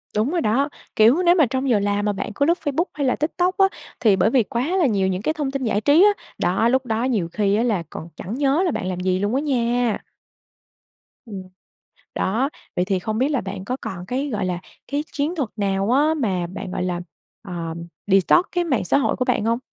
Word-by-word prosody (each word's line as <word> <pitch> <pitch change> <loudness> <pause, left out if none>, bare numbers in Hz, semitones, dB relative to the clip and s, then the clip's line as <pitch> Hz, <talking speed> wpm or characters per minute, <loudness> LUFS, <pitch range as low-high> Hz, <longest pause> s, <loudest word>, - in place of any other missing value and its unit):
Đúng 220 +8 +1
rồi 350 - 0
đó, 270 +5 +1 0.3
kiểu, 230 +10 +5
nếu 345 0 +5
mà 320 -5 +5
trong 260 +2 -2
giờ 225 -4 +4
làm 205 0 0
mà 210 - +1
bạn 205 - -4
cứ 280 - +2
lướt 340 +3 +3
Facebook 290 +3 +1
hay 285 -2 -1
là 250 - +2
TikTok 355 +4 0
á, 390 - +6 0.3
thì 215 -5 +4
bởi 190 +3 +3
vì 245 0 +3
quá 250 - -2
là 360 - +3
nhiều 200 -7 +2
những 185 0 -1
cái 310 - 0
thông 295 -4 -2
tin 275 -1 -3
giải 215 -3 0
trí 295 - +5
á, 415 - +7 0.3
đó, 195 +6 +2
lúc 260 +1 +1
đó 225 0 -1
nhiều 225 -10 0
khi 205 -1 +1
á 225 - +2
là 210 -8 0
còn 160 - -8
chẳng 195 - -6
nhớ 280 +5 +2
là 350 - +1
bạn 185 - -3
làm 185 -1 -3
gì 185 0 0
luôn 205 +5 0
á 275 - +1
nha. 245 -5 0 1.2
Ừm. 200 -5 -7 0.7
Đó, 235 +8 0 0.3
vậy 180 - +1
thì 190 -1 0
không 215 +4 -3
biết 260 +4 +2 0.2
bạn 190 0 -6
có 255 +4 -2
còn 180 -1 -6
cái, 265 +8 -2
gọi 205 -6 -2
là, 180 -1 -2 0.3
cái 290 +1 0
chiến 300 +4 -1
thuật 280 -9 -2
nào 195 0 0
á, 295 +5 +4
mà 190 - -1
bạn, 195 +1 -7
gọi 180 - -2
là, 175 -1 -2 0.4
ờm, 170 -4 -6 0.2
detox 195 - +4
cái 355 -1 0
mạng 275 -9 0
xã - - +3
hội 280 - +1
của 255 - -1
bạn 245 -4 +1
hông? 230 +1 +1
230 Hz, 235 wpm, -22 LUFS, 195-280 Hz, 1.2 s, á